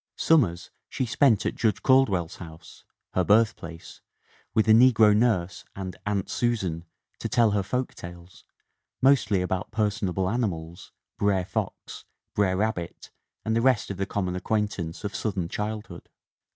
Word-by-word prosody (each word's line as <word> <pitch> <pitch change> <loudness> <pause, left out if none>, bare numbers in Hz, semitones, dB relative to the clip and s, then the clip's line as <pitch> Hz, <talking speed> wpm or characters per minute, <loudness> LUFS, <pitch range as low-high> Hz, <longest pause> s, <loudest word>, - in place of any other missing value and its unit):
Summers 100 - +2 0.2
she 130 - -2
spent 120 -2 +3
at - - 0
Judge 110 -2 -1
Caldwell's 105 -11 +3
house, 80 0 -12 0.3
her 95 - +2
birthplace, 100 -5 0 0.5
with 110 0 +3
a - - +6
negro 110 -2 +6
nurse 95 -6 +1
and 95 -1 -6
"Aunt 100 -2 -1
Susan" 95 -9 -1 0.3
to - - -4
tell 115 -3 +3
her 100 -1 +1
folk 125 +6 -3
tales, 85 0 -12 0.6
mostly 115 -8 +3
about 90 0 -3
personable 100 -4 -1
animals, 90 -6 -3 0.3
Brer 100 -3 +1
Fox, - - -5 0.3
Brer 95 -2 +1
Rabbit 95 -5 -3 0.3
and 110 - 0
the 115 - +2
rest 125 -5 +2
of 100 - -6
the 95 - -2
common 90 -3 -2
acquaintance 100 -4 -2
of 100 - -4
Southern 95 -6 -2
childhood. 105 +3 -6
100 Hz, 140 wpm, -26 LUFS, 90-110 Hz, 0.6 s, a